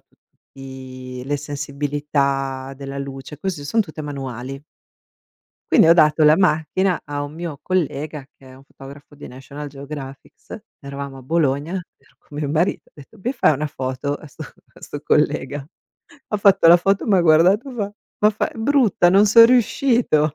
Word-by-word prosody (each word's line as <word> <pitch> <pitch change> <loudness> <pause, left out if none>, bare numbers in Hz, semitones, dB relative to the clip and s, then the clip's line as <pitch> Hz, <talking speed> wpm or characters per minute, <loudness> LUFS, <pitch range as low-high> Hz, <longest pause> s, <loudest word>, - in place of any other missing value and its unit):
tutti 130 -1 -12
le 145 +1 -1
sensibilità 140 -2 -2
della 140 0 -7
luce. 140 +1 -8
Queste 175 -4 -4
son 225 +10 +1
tutte 155 -5 -5
manuali. 135 -2 -6 1.1
Quindi - - +6
ho 165 - +8
dato 155 -2 +4
la 150 +1 +6
macchina 180 +1 +1
a 145 -1 -4
un 145 +1 -6
mio 165 -2 -6
collega 155 -5 -2
che 135 - -21
è 130 - -14
un 135 - -18
fotografo 140 +1 -14
di 145 - -11
National 140 +3 -9
Geographics, 140 +7 -10 0.2
eravamo 140 -1 -7
a - - -12
Bologna. 150 +2 0 0.2
Ero - - -30
con 145 - -12
mio 145 -2 -2
marito, 160 +5 -1
ho - - -36
detto: 155 +8 -16
"Mi 245 - -1
fai 195 - +3
una 150 +2 -2
foto?", 130 +1 -3
a 150 - -11
'sto 140 - -11
a - - -16
'sto - - -8
collega. 140 +1 0 0.7
Ha 210 - 0
fatto 195 -4 +4
la 170 +1 +9
foto, 195 +3 0
m'ha 195 -4 +4
guardato 180 - +4
fa 205 -5 -4 0.3
ma 210 +1 +4
fa: 210 - -2
"È - - -15
brutta, 225 -7 +3
non 200 +3 +5
son 230 +3 +8
riuscito". 235 - +2
150 Hz, 170 wpm, -21 LUFS, 135-175 Hz, 1.1 s, la